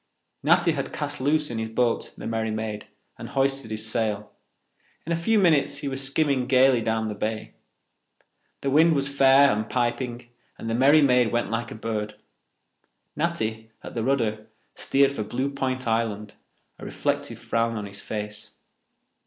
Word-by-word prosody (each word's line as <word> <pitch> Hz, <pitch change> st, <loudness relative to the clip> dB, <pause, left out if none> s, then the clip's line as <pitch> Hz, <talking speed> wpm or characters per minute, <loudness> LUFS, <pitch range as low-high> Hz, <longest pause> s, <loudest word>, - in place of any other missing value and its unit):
Natty -, -, +4 dB
had -, -, -3 dB
cast -, -, -4 dB
loose 150 Hz, +1 st, +1 dB
in 115 Hz, -, -3 dB
his 110 Hz, 0 st, -3 dB
boat, 115 Hz, +1 st, 0 dB
the -, -, -8 dB
Merry 110 Hz, 0 st, -1 dB
Maid, 110 Hz, -1 st, -4 dB, 0.3 s
and -, -, -7 dB
hoisted 135 Hz, -3 st, 0 dB
his 110 Hz, 0 st, -3 dB
sail. 110 Hz, -2 st, -2 dB, 0.7 s
In 165 Hz, -, -4 dB
a -, -, +3 dB
few 190 Hz, +7 st, +1 dB
minutes 155 Hz, -7 st, +3 dB
he 145 Hz, -, -5 dB
was 135 Hz, 0 st, -3 dB
skimming 135 Hz, -2 st, +1 dB
gaily 130 Hz, -2 st, +4 dB
down 110 Hz, 0 st, -1 dB
the 105 Hz, -, -3 dB
bay. 110 Hz, +1 st, -4 dB, 1.1 s
The 135 Hz, -, -1 dB
wind 160 Hz, +3 st, +5 dB
was 140 Hz, -1 st, +1 dB
fair 140 Hz, 0 st, +6 dB
and 110 Hz, +1 st, -2 dB
piping 120 Hz, 0 st, -2 dB, 0.3 s
and -, -, -7 dB
the 115 Hz, -, -1 dB
Merry 140 Hz, +5 st, +5 dB
Maid 125 Hz, -4 st, +4 dB
went 120 Hz, -3 st, -1 dB
like 115 Hz, 0 st, -2 dB
a -, -, -8 dB
bird. 105 Hz, -1 st, -4 dB, 1.0 s
Natty, 110 Hz, 0 st, -2 dB
at -, -, -8 dB
the 115 Hz, -, -2 dB
rudder, 110 Hz, -5 st, 0 dB, 0.3 s
steered 140 Hz, 0 st, +2 dB
for 140 Hz, -, -4 dB
Blue 130 Hz, +6 st, -2 dB
Point 130 Hz, -2 st, -2 dB
Island, 110 Hz, -2 st, -1 dB, 0.5 s
a -, -, -11 dB
reflective -, -, -2 dB
frown 115 Hz, 0 st, -1 dB
on 105 Hz, -, -4 dB
his 100 Hz, 0 st, -9 dB
face. 105 Hz, -1 st, -6 dB
120 Hz, 170 wpm, -25 LUFS, 110-135 Hz, 1.1 s, fair